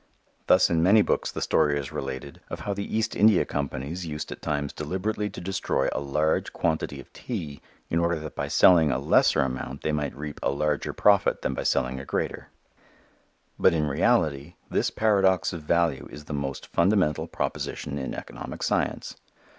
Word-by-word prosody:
Thus 90 - +6
in 80 -1 +2
many 100 +5 +6
books - - 0
the - - -3
story 75 -1 +2
is 70 -3 -6
related 65 +1 -6
of - - -6
how 100 - -2
the 100 +2 -3
East 110 - -1
India 105 -3 +5
Companies 70 +4 -4
used 75 -3 -5
at - - -8
times 70 -1 -2
deliberately 105 +3 -2
to - - -9
destroy 95 -7 -1
a - - -2
large 75 +2 0
quantity 80 -4 -1
of 70 - -13
tea 80 - -6 0.3
in 85 - 0
order 85 0 +1
that 75 -1 -8
by - - -2
selling 85 -4 +6
a 65 - +1
lesser 70 - +3
amount 65 +2 -4
they 75 - 0
might 75 -2 -2
reap 75 0 -6
a - - +1
larger 75 +1 -1
profit 100 -2 +3
than - - 0
by - - -3
selling 65 +1 0
a 70 - -8
greater. - - -3 1.1
But 85 - +4
in 75 -2 +1
reality 75 +2 +1 0.2
this - - +1
paradox 95 -5 +2
of 85 - -5
value 80 -3 +1
is 75 0 -10
the 75 - -6
most 70 -2 -4
fundamental 90 -4 +2
proposition 70 +1 -4
in 65 - -4
economic - - -7
science. - - -1
75 Hz, 180 wpm, -26 LUFS, 70-90 Hz, 1.1 s, Thus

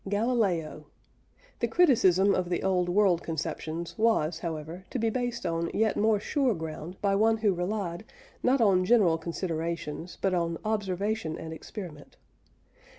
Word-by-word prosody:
GALILEO. 205 -9 0 0.7
The - - +1
criticism 200 - +4
of 180 -2 -1
the 175 - -1
old 180 -2 +1
world 185 -2 +3
conceptions 165 +1 -4
was, 175 -8 +2
however, 165 +2 -5
to - - -3
be 225 -1 +1
based 245 -3 -3
on 165 0 -1
yet 220 0 +2
more 215 0 +3
sure 260 +1 +1
ground 160 +2 -7
by 200 -1 +3
one 220 +3 +3
who 215 -3 +2
relied, 180 0 -3 0.4
not 255 +1 +3
on 190 -4 +4
general 185 -6 +4
considerations, 170 -1 -4
but 195 -1 +1
on 170 -2 0
observation 205 -4 -1
and 160 0 -7
experiment. 160 -3 -9
185 Hz, 145 wpm, -28 LUFS, 165-215 Hz, 0.7 s, criticism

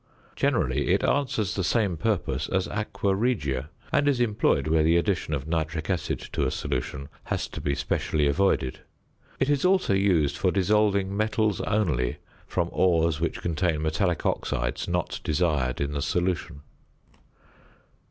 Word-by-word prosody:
Generally - - +1
it - - +2
answers 130 -8 0
the 95 - -1
same 100 -2 +1
purpose 80 - -1
as 95 -1 0
aqua 105 -1 -1
regia, 75 - -1 0.2
and 145 0 +3
is 140 -4 +2
employed 105 - +2
where 80 0 +3
the 80 +2 +4
addition 85 -2 0
of 70 +1 -5
nitric 80 +1 -2
acid 90 - -1 0.2
to - - 0
a - - +1
solution 70 +2 -3 0.2
has - - -2
to - - -8
be 70 - 0
specially 75 +1 0
avoided. 70 -3 +1 0.6
It 135 - +2
is 145 -1 +1
also 185 - +3
used 90 -7 +2
for 95 - +2
dissolving 100 0 +2
metals 110 -1 +1
only 80 - 0 0.3
from 85 -2 -1
ores 85 -3 +2
which 85 - -2
contain 85 -2 0
metallic 80 +2 0
oxides - - -1
not 90 0 -2
desired 75 -6 0
in 70 0 -1
the 70 -1 -2
solution. 85 -2 -1
85 Hz, 150 wpm, -26 LUFS, 75-100 Hz, 0.6 s, the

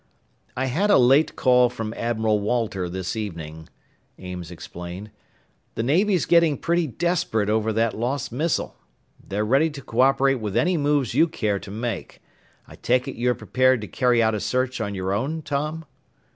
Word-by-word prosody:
"I 130 - 0
had 165 +11 0
a 205 - +6
late 135 +5 +4
call 125 -1 +4
from 115 -2 -5
Admiral 110 -2 0
Walter 105 -4 -1
this 95 +3 -4
evening," 80 -7 -6 0.5
Ames 90 -2 -7
explained. 90 +3 -8 0.6
"The 115 - -1
Navy's 180 - +2
getting 170 -4 +4
pretty 170 -1 0
desperate 125 - 0
over 110 0 +1
that 115 +1 +1
lost 125 +4 -2
missile. 155 +7 -1 0.5
They're 105 +2 -2
ready 135 +8 +3
to 145 -2 -9
co 115 - -5
operate 135 0 +3
with 105 -3 -3
any 180 +1 +2
moves 145 -5 +1
you 160 +6 +4
care 105 -10 -1
to 100 - -11
make. 110 0 -5 0.5
I - - -14
take 125 +1 +1
it 135 - -5
you're 125 +1 +1
prepared 130 -1 +2
to 105 - -6
carry 125 -2 +2
out 110 0 +2
a 105 - -1
search 130 +2 -1
on 100 -2 -3
your 95 0 -2
own, 145 +9 -2
Tom?" 150 +3 -3
120 Hz, 170 wpm, -23 LUFS, 105-140 Hz, 0.6 s, a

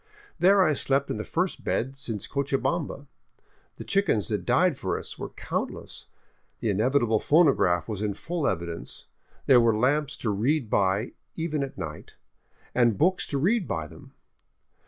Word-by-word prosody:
There 195 +2 +6
I 155 - +3
slept 140 0 0
in - - -2
the 105 - -3
first 180 - -2
bed 130 +3 -1
since 115 -7 -5
Cochabamba. 140 +2 -2 0.7
The - - -8
chickens 170 - +1
that - - -2
died - - +3
for - - -2
us - - -8
were - - -5
countless, - - -5 0.5
the 110 - 0
inevitable 115 +1 +2
phonograph 140 - +3
was 105 -3 -4
in 105 -2 -1
full 170 -3 -2
evidence, 85 0 -4 0.4
there 125 -3 +6
were 115 -2 +3
lamps 145 +5 +1
to 110 - -1
read 120 +4 0
by 100 +4 +1 0.2
even 160 -3 -2
at 135 -1 -5
night, 75 -2 -7 0.6
and 120 -4 +3
books 185 +3 +2
to 140 - -2
read 195 - +1
by 80 -5 -2
them. 75 - -14
135 Hz, 155 wpm, -26 LUFS, 105-155 Hz, 0.7 s, There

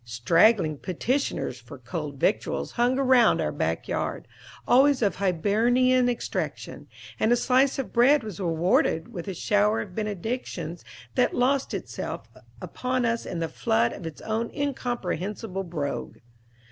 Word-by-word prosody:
Straggling 155 - +3
petitioners 205 - -2
for 125 +4 -12
"cold 140 +3 -6
victuals" 205 - 0
hung 245 +2 +1
around 260 -4 +4
our - - 0
back - - -2
yard, - - -3 0.4
always 270 +1 +5
of 200 -5 +1
Hibernian 235 +7 +2
extraction; 240 - -4 0.3
and 220 - +2
a - - +6
slice 260 +2 +2
of 270 - -4
bread 255 +3 +5
was 210 -5 -7
rewarded 170 +2 +1
with 175 -2 -6
a 190 - -4
shower 210 +4 +2
of 190 - -8
benedictions 205 -5 -4 0.3
that - - +1
lost 265 +2 +1
itself - - -6 0.3
upon 255 -1 -2
us 230 0 -1
in - - -4
the 165 0 -1
flood 120 -3 +1
of 165 - -7
its 155 - -9
own 225 +1 -2
incomprehensible 215 - -3
brogue. 155 -5 -4
210 Hz, 140 wpm, -26 LUFS, 165-245 Hz, 0.4 s, a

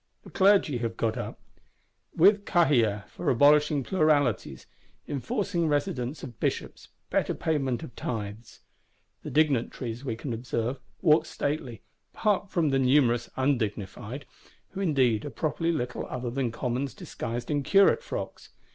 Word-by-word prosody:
The - - -13
Clergy 190 -9 +4
have 115 -1 -3
got 115 -1 0
up; - - -6 0.8
with 200 +4 +5
Cahiers 120 - +2
for 175 - -3
abolishing 145 +2 +4
pluralities, 145 - +1 0.4
enforcing 170 - -1
residence 145 -2 -1
of 120 -4 -9
bishops, - - -3 0.2
better - - +1
payment 135 -7 -1
of 120 - -10
tithes. 110 -1 -6 0.6
The - - -6
Dignitaries, 130 -5 0
we 125 -5 -2
can 120 +2 -5
observe, 120 +2 -2 0.2
walk 155 -2 +4
stately, 130 -7 -3 0.3
apart 205 -3 +1
from 165 -5 +1
the 135 -1 +2
numerous 125 -3 +3
Undignified,—who 125 - -4
indeed 130 - +2
are 145 - -4
properly 165 +3 -1
little 125 -6 -3
other 125 -1 -4
than 125 -2 -1
Commons 125 +1 -3
disguised 120 +3 -5
in 145 -1 +1
Curate 195 - +4
frocks. - - -6
135 Hz, 130 wpm, -27 LUFS, 120-155 Hz, 0.8 s, with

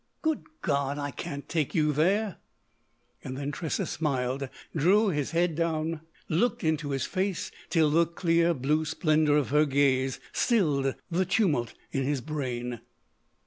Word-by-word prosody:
Good 315 -1 +1 0.2
God! 140 -3 0
I 145 -1 -3
can't 140 +2 -6
take 155 -4 -1
you 150 -2 +3
there!" 195 +6 +1 0.9
Then 140 +2 -4
Tressa 160 +1 -2
smiled, 135 -3 -1 0.3
drew 195 +8 +4
his 150 -6 -1
head 170 0 +1
down, 160 0 -1 0.3
looked 185 +10 +1
into 155 -2 0
his 135 -1 -1
face 190 -1 -2 0.2
till 160 -3 +3
the 165 +2 +4
clear 170 0 +2
blue 150 +4 +1
splendour 155 -1 +2
of 145 - 0
her 150 +1 +4
gaze 135 -2 +2
stilled 150 - +2 0.2
the 185 +3 +2
tumult 165 - +1 0.2
in 135 - -1
his 140 +1 0
brain. 125 -5 -4
155 Hz, 145 wpm, -28 LUFS, 140-170 Hz, 0.9 s, drew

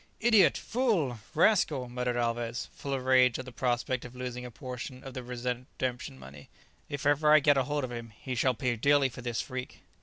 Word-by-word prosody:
"Idiot! 220 -5 +5
fool! 190 - 0 0.2
rascal!" 150 - +3
muttered 125 0 -2
Alvez, 120 0 -2
full 140 - -6
of 130 -1 -5
rage 130 -2 +5
at 130 - -6
the 130 - -9
prospect 120 0 -1
of 125 0 -10
losing 125 -1 -5
a 125 - -6
portion 125 +2 -7
of 135 - -8
the 130 - -5
redemption 125 - -4
money; 70 +2 -12 0.4
"if 140 -1 -5
ever 145 +1 +4
I 155 - +8
get 145 0 +4
hold 145 +2 0
of 125 - -4
him, 115 -1 -7
he 130 - -4
shall 125 +1 +2
pay 125 +1 0
dearly 140 +3 +3
for 125 - -10
this 120 -2 -2
freak." 130 0 -7
125 Hz, 200 wpm, -30 LUFS, 120-140 Hz, 0.4 s, I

